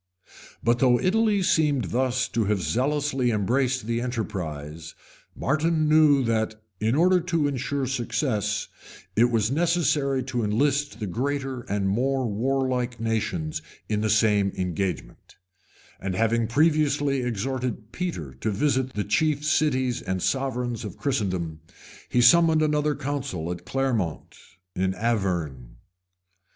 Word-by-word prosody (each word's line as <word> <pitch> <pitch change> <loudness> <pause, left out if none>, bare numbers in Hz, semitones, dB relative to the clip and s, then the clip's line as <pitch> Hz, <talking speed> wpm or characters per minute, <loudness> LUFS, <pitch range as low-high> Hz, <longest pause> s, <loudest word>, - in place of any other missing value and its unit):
But 120 +1 +2
though 125 -2 +4
Italy 210 0 +2
seemed 145 - +2
thus 130 +1 +1
to 115 -2 0
have 105 0 +1
zealously 135 0 0
embraced 120 +4 0
the 115 +1 -1
enterprise, 80 - -5 0.4
Martin 155 +2 +1
knew 150 -3 +5
that, 110 -2 -1 0.2
in 110 +3 +1
order 180 +4 +4
to 165 -4 0
insure 140 0 -2
success, 120 -5 -1 0.5
it 115 - +5
was 115 -1 +1
necessary 150 -4 +1
to 125 -2 -2
enlist 140 +4 0
the 110 - -3
greater 135 +5 -2
and 100 0 0
more 130 +6 +1
warlike 125 +2 -1
nations 90 -9 -2 0.3
in 105 -1 -1
the 110 - 0
same 105 -2 +3
engagement; 90 -2 -4 0.6
and 95 -1 -3
having 115 +2 +1
previously 145 0 +2
exhorted 125 -1 -3
Peter 145 - -4
to 65 - -3
visit 130 +4 0
the 105 - -1
chief 150 +7 +1
cities 130 -5 +1
and 95 -1 -3
sovereigns 125 -4 -1
of - - -7
Christendom, 95 - -2 0.5
he 120 - +3
summoned 160 +4 +6
another 150 -1 +1
council 130 - -3
at 90 0 -7
Clermont, 120 - -2 0.4
in 95 +1 0
Auvergne. 85 - -2
125 Hz, 125 wpm, -25 LUFS, 105-140 Hz, 0.6 s, summoned